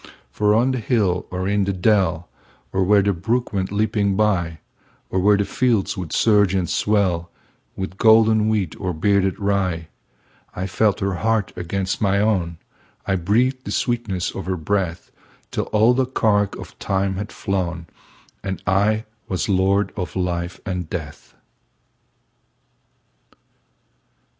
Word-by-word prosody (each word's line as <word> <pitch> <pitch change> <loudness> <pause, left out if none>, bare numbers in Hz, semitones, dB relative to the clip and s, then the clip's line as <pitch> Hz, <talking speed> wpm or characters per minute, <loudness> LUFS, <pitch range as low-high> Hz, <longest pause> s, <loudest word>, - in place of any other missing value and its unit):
For 105 0 +2
on 120 +4 +3
the 130 - -1
hill 105 -6 0
or 90 +1 -3
in 100 0 +1
the 100 - -1
dell, 90 -3 +1 0.5
Or 95 0 +2
where 100 +1 +4
the 100 0 +2
brook 115 +9 -1
went 95 -1 -1
leaping 105 -1 +1
byOr 90 -7 +1 0.5
where 100 +2 +3
the 100 - 0
fields 115 -1 +1
would 90 -4 -6
surge 105 -4 +3
and 90 -2 0
swellWith 95 -1 -2
golden 110 -1 +5
wheat 100 -7 0
or 90 -2 -2
bearded 95 +2 +1
rye,I 95 -2 -4
felt 100 +2 +1
her 100 0 0
heart 110 -3 0
against 95 +2 -3
my 100 -1 +2
own,I 95 -2 -3
breathed 120 +9 +1
the - - -7
sweetness 110 -7 -1
of 95 -2 -7
her 95 -1 -1
breath, 90 0 -2 0.4
Till - - -2
all 110 +3 +3
the 130 0 +1
cark 105 -5 +1
of - - -11
time 95 -1 -1
had 105 +2 -5
flown, 90 -4 -3 0.6
And 95 -1 -3
I 105 +3 +2 0.2
was 95 +2 -2
lord 100 +1 +2
of 90 -4 -5
life 90 -1 -2
and 90 -4 -3
death. 75 -4 -7
100 Hz, 135 wpm, -21 LUFS, 90-105 Hz, 0.6 s, golden